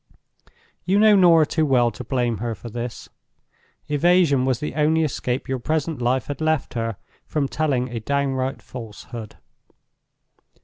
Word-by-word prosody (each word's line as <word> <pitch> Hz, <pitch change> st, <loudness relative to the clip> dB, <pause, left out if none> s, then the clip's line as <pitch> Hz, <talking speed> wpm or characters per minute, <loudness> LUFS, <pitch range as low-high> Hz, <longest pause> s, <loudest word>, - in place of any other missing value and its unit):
You 185 Hz, +3 st, +2 dB
know 215 Hz, 0 st, +6 dB
Norah 170 Hz, -4 st, +6 dB
too 160 Hz, +2 st, 0 dB
well 125 Hz, -5 st, +3 dB
to 115 Hz, -, -8 dB
blame 120 Hz, -2 st, -1 dB
her 115 Hz, 0 st, -3 dB
for 115 Hz, +5 st, -9 dB
this. 120 Hz, +1 st, -6 dB, 0.8 s
Evasion 150 Hz, -3 st, +3 dB
was 130 Hz, -3 st, 0 dB
the 150 Hz, -, -4 dB
only 155 Hz, +1 st, +2 dB
escape 130 Hz, -3 st, -2 dB
your 130 Hz, -1 st, -2 dB
present 155 Hz, +1 st, -2 dB
life 125 Hz, 0 st, +1 dB
had 145 Hz, +2 st, -6 dB
left 155 Hz, -2 st, 0 dB
her, 115 Hz, -3 st, -3 dB, 0.3 s
from 145 Hz, -3 st, -1 dB
telling 135 Hz, -4 st, 0 dB
a 120 Hz, -1 st, -4 dB
downright 135 Hz, +1 st, -1 dB
falsehood. 115 Hz, -1 st, -9 dB
135 Hz, 145 wpm, -22 LUFS, 120-155 Hz, 0.8 s, know